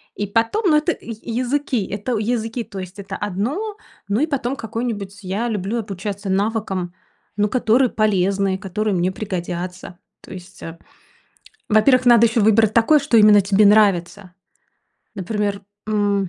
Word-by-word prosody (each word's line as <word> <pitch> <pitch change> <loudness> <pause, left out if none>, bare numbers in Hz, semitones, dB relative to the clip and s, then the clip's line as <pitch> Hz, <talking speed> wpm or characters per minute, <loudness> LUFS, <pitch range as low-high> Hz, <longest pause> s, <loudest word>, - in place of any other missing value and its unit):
И 205 - -3
потом, 230 - +1
ну 305 - +4
это 310 +3 0
языки, 245 +2 -2
это 215 +4 -3
языки 225 +1 -2
то 200 - -11
есть 185 +2 -9
это 195 -1 -7
одно. 265 - -3 0.3
Ну 200 +2 0
и 310 - +2
потом 270 -3 -2
какой-нибудь, 220 -4 -5
я 200 +6 -2
люблю 210 +2 -2
обучаться 200 -1 -5
навыкам, 195 -3 -1 0.4
ну, 210 0 +1
которые 250 +1 +2
полезны, 195 -2 +1
которые 210 +1 -2
мне 180 +1 0
пригодятся. 180 -2 -6 0.2
То - - -14
есть, 185 +1 -12
э, 165 0 -8 0.9
во-первых, 250 +4 +4
надо 235 -1 +7
еще 225 0 0
выбрать 220 0 +4
такой, 265 +7 +4
что 280 -4 +1
именно 210 -1 +7
тебе 200 +2 +3
нравится. 200 -2 +2 0.8
Например, 200 0 -3 0.3
м. 205 -2 0
210 Hz, 145 wpm, -20 LUFS, 195-230 Hz, 0.9 s, надо